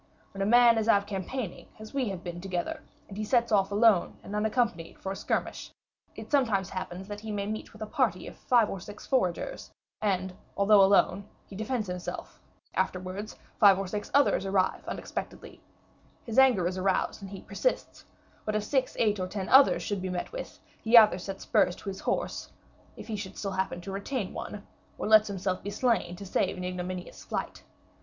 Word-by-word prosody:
When 195 - -5
a 195 - +1
man 235 0 +6
is 220 - -1
out 200 -3 +4
campaigning, 200 +2 -5
as 215 0 -11
we 265 -5 0
have 190 -2 -6
been 175 -1 -6
together, 180 -2 -3 0.3
and 195 - -10
he 215 - -3
sets 235 +1 +2
off 195 -2 +3
alone 210 -3 +3
and 205 - -6
unaccompanied 210 -5 0
for 190 - -5
a - - -3
skirmish, - - -3 0.4
it - - -9
sometimes 225 -10 +2
happens 185 0 -5
that 205 0 -6
he 220 0 -6
may 200 -1 -2
meet 215 +1 -5
with 220 -1 -8
a - - -3
party - - 0
of - - -9
five 240 -4 +3
or 195 - -5
six 205 +3 -10
foragers, 260 - -1 0.3
and 190 -3 0 0.2
although 200 0 +6
alone, 195 0 +3 0.2
he 195 - -12
defends 220 +2 -2
himself; 180 0 -6 0.3
afterwards, 185 +3 -3 0.2
five 200 -3 +7
or 195 - -2
six 205 +2 -4
others 280 -8 +3
arrive 195 -1 +1
unexpectedly, - - -6 0.6
his 230 +2 +1
anger 250 -10 +5
is 185 +1 -1
aroused 190 +2 0
and 195 - -8
he 195 -1 -8
persists; - - -2 0.4
but 215 - -2
if 215 - 0
six, 260 +3 0
eight, 210 -3 +2
or 185 - -2
ten 190 0 -4
others 270 +1 +6
should 205 -2 -2
still 185 0 -3
be 180 - -2
met - - -4
with, - - -7 0.2
he 230 +2 +6
either 210 -4 +7
sets 195 +1 -6
spurs 175 - +2
to - - -7
his 190 - -6
horse, - - -2 0.5
if - - -8
he 220 - -4
should 195 -2 -7
still 195 - -3
happen 190 -1 -2
to 180 +3 -7
retain 200 +2 -3
one, 205 -1 -7 0.3
or - - -3
lets 215 0 +7
himself 190 -2 -2
be 200 - -5
slain 205 -5 0
to 200 - -9
save 190 0 0
an 180 - -5
ignominious 180 0 -5
flight. - - -4
200 Hz, 200 wpm, -29 LUFS, 185-220 Hz, 0.6 s, five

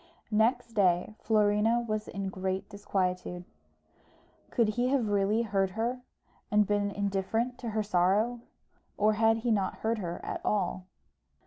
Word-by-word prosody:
Next 230 +2 +2
day, 185 -2 +2
Florina 215 +1 +3
was 215 0 -2
in 195 -1 -4
great 190 0 -3
disquietude. 180 -3 -2 1.0
Could 230 -3 +2
he 245 +3 0
have 255 -5 +1
really 205 +3 +2
heard 195 -3 +1
her, 245 +3 -1 0.5
and 210 0 +4
been 205 0 +1
indifferent 200 +5 -1
to 235 - -4
her 215 0 -1
sorrow; 205 +5 +2 0.6
or 215 +1 +3
had 225 +1 +3
he 240 - +3
not 195 -3 +1
heard 225 0 +1
her 175 -3 -4
at - - -4
all? 185 -2 -1
210 Hz, 140 wpm, -29 LUFS, 195-225 Hz, 1.0 s, and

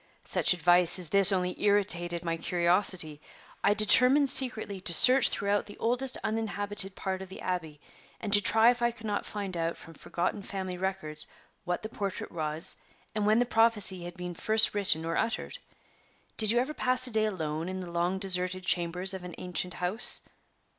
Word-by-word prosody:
Such - - +1
advice 175 +1 +4
as 180 -4 +1
this 200 +1 +7
only 180 -1 -2
irritated 175 -4 0
my 165 0 -2
curiosity. 170 -2 -1 0.4
I 205 - +2
determined 250 +7 +5
secretly 220 -7 +1
to 170 -2 +3
search 255 +6 +6
throughout 200 +1 -2
the 205 - -12
oldest 250 +3 -1
uninhabited 205 -3 -2
part 190 -1 -5
of 190 - -10
the 190 - -11
Abbey, 160 -5 -5 0.4
and 210 -2 -4
to 205 - +7
try 225 +3 +4
if 245 -1 -6
I 235 - +2
could 225 -1 -12
not 205 -1 -3
find 200 -3 -5
out 165 0 -3
from 165 - -14
forgotten 180 +6 -4
family 190 -2 -6
records 180 -5 -4 0.4
what 175 +2 -4
the 215 - -6
portrait 200 -3 -6
was, 155 -1 -6 0.4
and 210 -1 -2
when 215 +1 +3
the 245 - +2
prophecy 220 -6 +3
had 175 0 -9
been 180 0 -7
first 220 +5 +2
written 190 -6 +3
or 165 0 -3
uttered. 230 - -3 0.8
Did 215 -2 0
you 235 - +3
ever 260 +5 -1
pass 255 -3 -1
a 250 - -3
day 220 -1 +1
alone 160 -4 -5
in 185 0 -6
the 180 -2 -8
long 175 +2 -2
deserted 185 -1 -1
chambers 180 +2 0
of 190 -1 -8
an 180 -2 -9
ancient 180 0 -5
house?" 180 +6 +1
190 Hz, 185 wpm, -28 LUFS, 175-215 Hz, 0.8 s, this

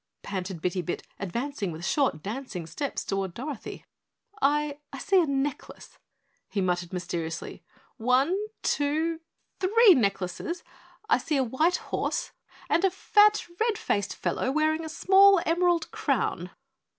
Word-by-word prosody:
panted 185 -3 -5
Bitty 180 0 0
Bit, 175 - -4
advancing 220 +1 -3
with 165 +2 -6
short 255 - +1
dancing 210 -5 -5
steps 280 - -4
toward 195 -2 -2
Dorothy. 270 -1 -6 0.6
"I 290 +1 +1
I 275 - -7
see 385 +6 +3
a 330 - 0
necklace," 275 0 -4 0.5
he 205 - -2
muttered 175 -2 -1
mysteriously. 170 -3 -4 0.4
"One 255 +8 +2 0.3
two 315 +3 0 0.4
three 420 +2 +6
necklaces! 200 - -1 0.4
I 445 - +4
see 300 - -1
a 265 - +3
white 305 +9 +1 0.2
horse - - -1 0.4
and 340 - +2
a 385 - +5
fat, 420 +3 +4
red 450 -1 +1
faced 200 - -1
fellow 260 - -1
wearing 310 +2 +1
a 320 - -5
small 390 +4 +6
emerald 345 0 +2
crown. - - -1
280 Hz, 135 wpm, -27 LUFS, -, 0.6 s, three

